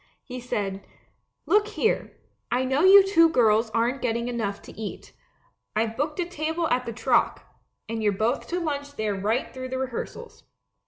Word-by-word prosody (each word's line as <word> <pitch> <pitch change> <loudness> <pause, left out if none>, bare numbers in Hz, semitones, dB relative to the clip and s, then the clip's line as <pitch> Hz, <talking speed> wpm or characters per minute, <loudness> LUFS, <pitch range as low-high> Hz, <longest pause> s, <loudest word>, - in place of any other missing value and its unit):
He 255 -2 -7
said, 200 -5 -3 0.6
"Look 420 +1 +3
here, 440 +1 -1 0.3
I 250 +2 +1
know 265 +3 +1
you 390 +1 +9
two 330 -4 +5
girls 225 -5 +3
aren't 235 +4 0
getting 235 0 -1
enough 210 -4 -2
to - - -11
eat; 215 -2 -8 0.6
I've 220 +1 0
booked 300 +5 -2
a 355 - +1
table 325 0 -2
at 250 0 0
the - - -2
Troc, 230 - +1 0.4
and 225 0 -3
you're 210 -1 +3
both 220 +6 -1
to 355 - -2
lunch 285 -3 -4
there 215 -3 -1
right 210 +6 -1
through 255 0 -6
the 260 - -3
rehearsals. 260 - -6
250 Hz, 170 wpm, -25 LUFS, 225-310 Hz, 0.6 s, you